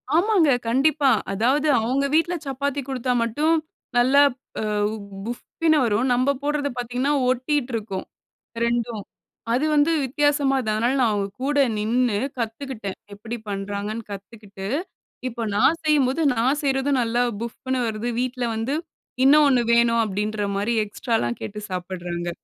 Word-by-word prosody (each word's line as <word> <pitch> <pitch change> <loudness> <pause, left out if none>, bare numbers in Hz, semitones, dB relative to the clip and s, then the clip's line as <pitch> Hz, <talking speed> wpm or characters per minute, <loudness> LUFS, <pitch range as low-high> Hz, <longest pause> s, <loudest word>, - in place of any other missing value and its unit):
ஆமாங்க. 360 -4 +4 0.2
கண்டிப்பா. 275 +3 +3 0.2
அதாவது 260 +9 +2
அவுங்க 265 +5 0
வீட்ல 345 +2 +2
சப்பாத்தி 280 +1 -2
குடுத்தா 250 -1 -1
மட்டும் 295 +8 +1 0.4
நல்லா 260 +4 +5 0.4
அ - - -2 0.3
வ் 220 - -5 0.3
புஃப்னு 310 +7 0
வரும். 225 +4 +1
நம்ம 255 +3 +2
போடுறது 290 -1 0
பார்த்தீங்கன்னா, 250 +4 -1 0.2
ஒட்டிட்டு 255 +1 0
இருக்கும் 205 -4 -4 0.6
2ம். 235 -3 -1 0.5
அது 270 +5 +2
வந்து 295 +2 +4
வித்தியாசமா 285 0 +2
அதனால 220 +1 0
நான் 235 -3 +3
அவுங்க 200 -1 -1 0.2
கூட 290 +1 0 0.2
நின்னு 225 0 +1 0.2
கத்துக்கிட்டேன். 225 -3 -4 0.2
எப்பிடி 225 +4 -6
பண்ணுறாங்கன்னு 205 +3 -4
கத்துக்கிட்டு, 200 -1 -9 0.6
இப்ப 230 -2 -4
நான் 320 +9 +3
செய்யும்போது 295 0 +2
நான் 260 +6 +1
செய்றதும் 270 -1 +1
நல்லா 235 +1 +1 0.2
புஃப்னு 255 +2 -3
வருது. 220 +2 -3
வீட்ல 250 -1 -2
வந்து 255 +7 -1 0.5
இன்னும் 295 +2 +7
ஒண்ணு 250 -3 +3
வேணும் 235 0 +4
அப்பிடின்றமாரி 205 +1 -1
எக்ஸ்ட்ராலாம் 205 - -2
கேட்டு 210 - -6
சாப்பிடுறாங்க. 175 -1 -4
245 Hz, 130 wpm, -23 LUFS, 215-280 Hz, 0.6 s, இன்னும்